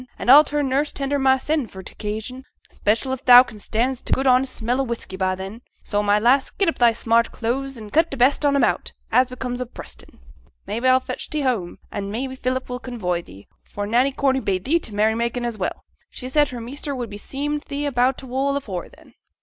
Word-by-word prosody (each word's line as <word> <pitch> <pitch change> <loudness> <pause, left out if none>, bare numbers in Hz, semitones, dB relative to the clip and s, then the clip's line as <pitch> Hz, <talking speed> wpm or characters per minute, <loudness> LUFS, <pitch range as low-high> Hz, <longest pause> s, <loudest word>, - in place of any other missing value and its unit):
An' 245 - +3
a'll 295 +3 +10
turn 290 -1 -1
nurse 280 +3 0
tender 280 0 -2
mysen 265 +1 +2
for 190 0 -10
t' - - -9
occasion, 220 +5 -5 0.3
'special 225 +5 0
if 260 - -6
thou 245 0 +10
can 215 -4 -12
stand 240 +5 -1
t' - - -8
good 265 - +1
honest 255 0 +3
smell 245 +4 0
o' - - +1
whisky 235 -6 -5
by 185 0 0
then. 195 +5 -8 0.2
So, 205 -1 0
my 205 0 +3
lass, 250 +6 +3
get 390 - -1
up 330 - 0
thy 240 -1 +6
smart 230 0 +1
clothes, 265 +3 -3
and 215 -2 -10
cut 325 +2 +4
t' 275 - -5
best 260 +5 +3
on 285 -1 +3
'em 280 - +3
out, - - 0 0.2
as 255 0 +4
becomes 250 0 -4
a 250 - -3
Preston. - - -10 0.5
Maybe, 235 +4 -1
a'll 255 0 +5
fetch - - -6
thee 305 - -1
home, 230 -10 -1
an' 200 -1 -4
maybe 260 +5 -4
Philip 255 0 -2
will 250 0 -5
convoy 190 -10 -3
thee, 100 - -15 0.2
for 205 - -5
Nanny 245 +6 +2
Corney 265 -1 +1
bade 190 -6 -2
thee 325 +6 +3
to 320 - -9
t' 210 - -9
merry 215 +1 +3
making, 235 +1 -2
as 230 -3 -4
well. 185 - -3 0.3
She 255 - -7
said 295 +1 +3
her 245 - -6
measter 275 +4 -5
would 240 -4 -5
be 205 - -7
seem' 290 +5 -3
thee 290 0 -3
about 255 -1 +2
t' - - -9
wool 270 +2 0
afore 190 -10 -5
then.' - - -19
250 Hz, 235 wpm, -22 LUFS, 220-270 Hz, 0.5 s, a'll